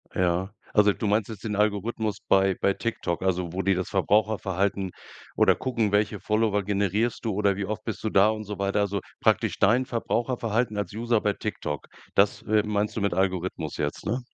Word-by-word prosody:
Ja. 90 +1 +1 0.2
Also 105 -1 +5
du 110 - -5
meinst 105 0 +2
jetzt 110 -4 -8
den 105 -2 -2
Algorithmus 105 0 0
bei 95 -1 +4
bei 100 - +3
TikTok, 95 -6 -3
also 90 -2 0
wo 95 +3 -2
die 95 -1 +2
das 95 0 -3
Verbraucherverhalten 100 -1 +1 0.4
oder - - +5
gucken, 115 -5 -1
welche 105 0 +1
Follower 105 -1 +1
generierst 100 +4 0
du 110 - 0
oder 100 -1 +1
wie 100 - -2
oft 105 +2 -4
bist 110 - -5
du 110 - 0
da 100 +1 +5
und 110 0 -3
so 105 -1 -6
weiter. 100 +1 0
Also 100 -1 -1 0.2
praktisch - - +1
dein 115 +6 +4
Verbraucherverhalten 115 -2 -1
als 100 -3 -3
User 115 +1 +1
bei 105 -1 0
TikTok. 75 -9 -4 0.3
Das, 100 +1 +3
äh, 105 -1 +2
meinst 105 0 -1
du 110 - -2
mit 100 -2 +1
Algorithmus 90 -4 -1
jetzt, 75 +3 -3
ne? 120 +5 -1
105 Hz, 190 wpm, -26 LUFS, 95-110 Hz, 0.4 s, Also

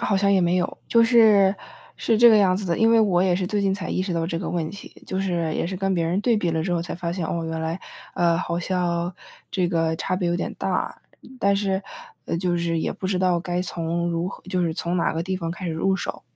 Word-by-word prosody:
好 200 - +1
像 200 +1 +3
也 190 - +4
没 175 +1 +2
有。 180 - -2
就 230 0 +5
是 215 -5 +5 0.4
是 225 -2 +1
这 240 0 +8
个 220 - +7
样 185 -3 +4
子 200 - -4
的， 170 - 0
因 225 0 +4
为 230 - +5
我 190 -5 +3
也 185 -2 +3
是 185 -1 -2
最 210 0 -1
近 195 -1 +1
才 190 -1 -4
意 185 - -1
识 185 -2 -3
到 165 -1 -1
这 165 -1 -2
个 - - -4
问 165 -3 -1
题， 200 - -11
就 190 - -2
是 170 -4 -1
也 - - -1
是 185 +2 -3
跟 195 0 0
别 170 -2 0
人 175 +4 0
对 230 0 +2
比 175 -5 0
了 160 -1 0
之 180 - -1
后 170 -1 0
才 170 - -6
发 170 -1 -3
现， 175 -2 -3
哦， 165 +1 -2
原 160 0 -3
来 160 +3 -3 0.3
呃， 170 -1 +2
好 170 -1 -2
像 175 -1 -1 0.4
这 180 -3 +1
个 165 -2 +1
差 185 +3 -2
别 180 -2 -1
有 175 - +1
点 - - -3
大。 - - -2 0.4
但 200 -3 +3
是， 195 -1 0 0.4
呃， - - -2
就 175 0 0
是 170 -1 -1
也 - - -1
不 190 - -5
知 185 -1 0
道 180 -2 +2
该 175 +1 -2
从 170 0 -2
如 170 +1 -1
何 - - -10
就 185 -1 0
是 165 -2 -1
从 170 +2 -2
哪 170 - +1
个 165 - -2
地 190 +2 -2
方 165 -2 -4
开 175 +2 -7
始 - - -1
入 190 +4 +1
手。 195 - -5
180 Hz, 295 characters per minute, -23 LUFS, 170-195 Hz, 0.4 s, 这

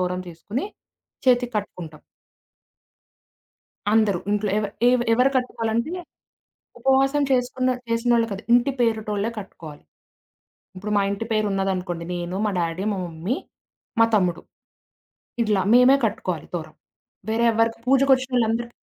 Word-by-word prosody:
తోరం 180 0 -1
చేసుకొని 200 - -5 0.6
చేతికి 245 -1 +3
కట్టుకుంటాం. 165 -6 -6 1.9
అందరూ. 215 -5 +3
ఇంట్లో 210 0 0
ఎవ 215 - -1 0.2
ఎవ 250 0 +3
ఎవరు 250 +4 +4
కట్టుకోవాలంటే, 235 +2 -1 0.9
ఉపవాసం 270 +2 +3
చేసుకున్న 255 0 +1 0.2
చేసినోళ్ళు 230 0 +2
కాదు, 200 0 -5
ఇంటి 245 +3 +4
పేరుటోళ్ళే 220 -2 0
కట్టుకోవాలి. 160 -7 -10 0.9
ఇప్పుడు 200 +3 -5
మా - - +4
ఇంటి 200 +3 -3
పేరు 215 -1 +1
ఉన్నదనుకోండి 185 -3 -2
నేను, 175 +1 -4
మా 210 - +1
డ్యాడీ, 170 +2 -2
మా - - -3
మమ్మీ, 170 +8 -3 0.7
మా - - +8
తమ్ముడు. 180 -4 +1 1.0
ఇట్లా 210 -3 +1
మేమే 250 +2 +7
కట్టుకోవాలి 185 -7 -3
తోరం. 155 -2 -6 0.5
వేరే 230 +2 +1
ఎవ్వరికి 225 +1 +1
పూజకొచ్చినోళ్ళందరి 255 -3 +2
220 Hz, 115 wpm, -23 LUFS, 185-245 Hz, 1.9 s, మా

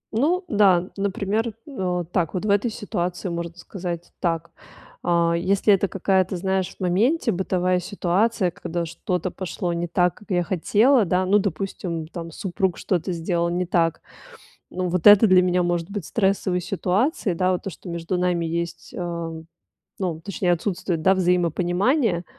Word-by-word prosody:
Ну 340 - +1
да, 190 - +3
например, 200 +3 -1
а, 180 -10 -2
так 170 +1 -2
вот 185 - -2
в 215 - -1
этой 205 +4 +2
ситуации 185 -5 -3
можно 170 0 -5
сказать 175 -1 -6
так. 165 -1 -1 0.5
А 170 -1 +2
если 195 +4 +3
это 195 0 +2
какая-то, 190 -1 +1
знаешь, 190 0 -1
в - - -40
моменте 225 - +2
бытовая 185 0 0
ситуация, 195 +2 0
когда 170 0 -4
что-то 175 +2 -3
пошло 180 -1 -3
не 170 +1 -2
так, 180 +1 +2
как 210 - -18
я 175 -2 +1
хотела, 215 - +3
да 180 +1 +1
ну, 200 +3 +4
допустим, 180 -3 -3
там 170 0 -7
супруг 185 0 -2
что-то 180 -1 -1
сделал 170 0 -1
не 180 +1 -1
так, 170 -2 +1 0.7
ну 185 0 -2
вот 175 -1 -1
это 205 +2 +9
для 185 -1 +6
меня 180 0 +2
может 175 +1 -1
быть 200 -5 -4
стрессовой 190 -3 +1
ситуацией, 195 - 0
да, 185 +2 +2
вот 180 - -2
то, - - -3
что 180 - -12
между 170 +1 -3
нами 180 -1 0
есть, 170 +1 -4
а, 170 -2 -3
м, 160 0 -9 0.5
ну, 175 -5 -2
точнее, 180 -1 -1
отсутствует, 175 -1 -1
да, 190 +4 +4
взаимопонимание. 180 - +1
180 Hz, 165 wpm, -23 LUFS, 170-195 Hz, 0.7 s, это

